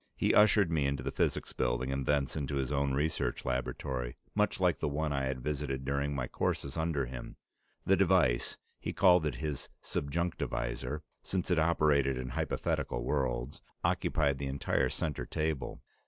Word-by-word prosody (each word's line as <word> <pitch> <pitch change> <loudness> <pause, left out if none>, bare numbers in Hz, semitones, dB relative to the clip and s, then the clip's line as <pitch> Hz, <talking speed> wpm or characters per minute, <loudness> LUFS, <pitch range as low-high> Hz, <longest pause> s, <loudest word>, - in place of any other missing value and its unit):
He - - +2
ushered 105 -4 +6
me 75 -4 +2
into 70 0 -1
the - - -2
Physics - - 0
Building, 60 +1 0
and 70 -1 -2
thence 70 -2 +1
into 70 -2 -2
his 65 0 -1
own 70 -1 +1
research 75 +3 -1
laboratory, 65 0 -2 0.2
much - - +1
like - - +2
the - - 0
one 75 +1 -1
I 70 -1 0
had 65 -2 -3
visited 70 -3 -2
during 70 +1 0
my 65 -2 -1
courses 70 +2 -2
under 80 -4 0
him. 60 0 -7 0.5
The 95 - +5
device 90 -10 +3 0.2
he - - -4
called 90 -4 +5
it 70 - -2
his 75 +2 -4
"subjunctivisor," 70 -3 -2 0.2
since 95 -1 -2
it 85 - +4
operated 75 -5 +3
in 65 0 -4
hypothetical - - -1
worlds 65 -1 -1 0.2
occupied 70 -4 +1
the 70 - -2
entire 70 +1 +1
center 75 -5 -2
table. 80 -3 -2
70 Hz, 165 wpm, -32 LUFS, 65-80 Hz, 0.5 s, ushered